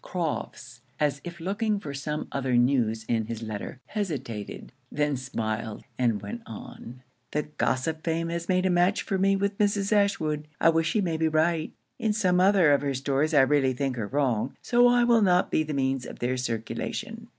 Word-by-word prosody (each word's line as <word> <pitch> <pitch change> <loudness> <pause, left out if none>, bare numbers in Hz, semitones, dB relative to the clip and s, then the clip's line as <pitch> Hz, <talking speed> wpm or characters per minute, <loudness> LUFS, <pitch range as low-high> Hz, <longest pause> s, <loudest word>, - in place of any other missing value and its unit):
Crofts, 145 -7 -4 0.2
as 145 -2 0
if 175 -1 -8
looking 205 +4 -1
for 145 -7 -7
some 150 +2 -4
other 130 -2 0
news 120 -3 +2
in 115 -2 0
his 115 -1 -5
letter, 110 +3 -6
hesitated, 135 - -5 0.2
then 150 -1 0
smiled, 110 -4 -4 0.2
and 115 -5 +1
went 100 +4 -6
on. 120 +3 -10 0.3
'The 150 - -1 0.2
gossip 155 +5 0
Fame 165 0 -1
has 170 0 -4
made 185 0 +2
a 185 - +3
match 180 +3 +2
for 195 - -1
me 195 +1 +3
with 200 +1 -1
Mrs. 200 -1 +1
Ashwood. 160 -8 +1
I - - +5
wish 165 0 +2
she 215 - +1
may 170 -4 -1
be 160 0 +2
right. 160 +1 +1 0.3
In 220 -3 +1
some 185 -4 +2
other 185 -4 +5
of 140 - +4
her 140 -2 -1
stories 140 +4 0
I 140 - +8
really 135 -1 +3
think 135 0 -2
her 110 -4 -3
wrong, 130 -4 0
so 245 0 +5
I 245 0 +4
will 235 -1 +4
not 180 -3 +3
be - - +2
the 155 0 -3
means 135 -2 0
of - - -9
their 125 +1 -1
circulation.' 115 -3 -4
150 Hz, 195 wpm, -27 LUFS, 130-180 Hz, 0.3 s, I